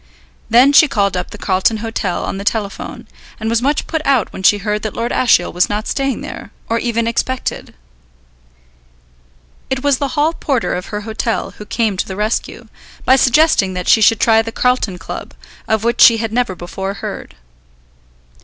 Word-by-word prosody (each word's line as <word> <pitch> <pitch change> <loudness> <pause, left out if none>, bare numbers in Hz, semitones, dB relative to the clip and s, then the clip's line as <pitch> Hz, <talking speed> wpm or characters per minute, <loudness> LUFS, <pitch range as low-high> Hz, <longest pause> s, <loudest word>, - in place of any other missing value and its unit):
Then 250 +5 +5
she 310 +1 +7
called 200 -7 0
up 180 - -3
the - - -10
Carlton 195 +3 +1
Hotel 215 -4 -3
on 195 - -4
the - - -5
telephone, 205 -1 -4 0.3
and 220 +1 -2
was 230 0 +1
much 285 +3 0
put 320 -1 -3
out 270 -7 +1
when - - -7
she 205 +2 +5
heard 210 +1 -2
that 215 -1 -5
Lord 235 +1 -2
Ashiel 225 -8 +2
was 180 +1 +2
not 210 +2 -3
staying 275 -1 -1
there, - - -8 0.2
or 230 +1 0
even 230 -1 -1
expected. 250 +3 -3 1.9
It 265 0 -2
was 285 -2 +2
the 280 +1 -3
hall 305 +3 +2
porter 275 -7 -1
of 180 +1 -4
her 210 0 -5
hotel 220 +1 -3
who 210 - -8
came 220 -5 -1
to - - -2
the 190 - -6
rescue, 210 +3 -3 0.4
by 260 - +6
suggesting 260 - +3
that 180 -1 -4
she 220 - +5
should 220 +1 +4
try 225 -1 +4
the 225 0 -6
Carlton 250 -7 0
Club, 165 - -8 0.3
of 220 -1 0
which 235 +1 0
she 230 -2 +8
had 225 -1 -3
never 240 -6 0
before 190 +3 -5
heard. 175 - -7
225 Hz, 185 wpm, -17 LUFS, 200-250 Hz, 1.9 s, she